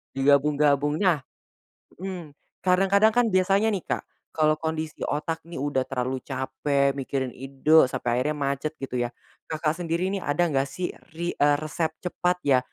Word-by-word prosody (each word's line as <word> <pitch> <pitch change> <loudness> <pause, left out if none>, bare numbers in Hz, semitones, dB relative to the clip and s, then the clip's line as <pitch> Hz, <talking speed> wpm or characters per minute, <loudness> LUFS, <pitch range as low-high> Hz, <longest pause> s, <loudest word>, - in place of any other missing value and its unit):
Di 135 - -1
gabung-gabungnya. 145 +3 +3 0.7
Mhm. 180 -4 -6 0.3
Kadang-kadang 195 +4 +4
kan 240 +2 +3
biasanya 195 +4 +3
nih, 190 - -1
Kak, - - -1 0.3
kalo 155 -1 +2
kondisi 160 0 -4
otak 160 +2 -2
nih 170 - -7
udah 140 -1 0
terlalu 130 0 -2
capek 140 +1 0
mikirin 135 -2 -3
ide 135 +2 +3
sampai 120 0 -1
akhirnya 150 +2 0
macet 140 +2 -1
gitu 125 -2 -3
ya, 120 - -1 0.4
Kakak 155 -1 0
sendiri 175 +3 -1
nih, 195 - -2
ada 145 +4 +1
nggak 140 -4 +1
sih 180 +6 -4 0.2
ri 170 +2 -3
eee, 145 0 +3
resep 155 +1 -2 0.2
cepat 180 0 0
ya, 130 -3 +5
150 Hz, 155 wpm, -26 LUFS, 140-175 Hz, 0.7 s, ya